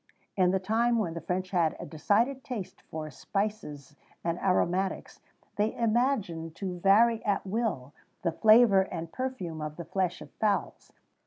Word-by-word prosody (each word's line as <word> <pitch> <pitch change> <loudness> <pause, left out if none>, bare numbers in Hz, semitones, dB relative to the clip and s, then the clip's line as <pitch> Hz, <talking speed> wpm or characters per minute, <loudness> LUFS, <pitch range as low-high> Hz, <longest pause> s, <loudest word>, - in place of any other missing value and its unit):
"In 185 -2 +3
the 190 +1 +2
time 230 +5 +1
when 185 -7 -1
the 170 - -6
French 180 +3 -3
had 170 -4 +2
a - - -6
decided 220 - 0
taste 220 -8 -6
for 155 -1 -5
spices 150 - -4 0.3
and 170 0 -1
aromatics, 185 0 0 0.4
they 210 +2 +1
imagined 215 - 0
to 180 -2 -5
vary 220 +5 +4
at 200 -2 0
will 190 - -2 0.3
the 170 - +1
flavour 215 +1 +6
and 170 -3 -5
perfume 185 -9 -4
of 150 0 -5
the 170 - -7
flesh 185 +1 -1
of - - -12
fowls. 210 -2 -2
190 Hz, 155 wpm, -29 LUFS, 170-220 Hz, 0.4 s, flavour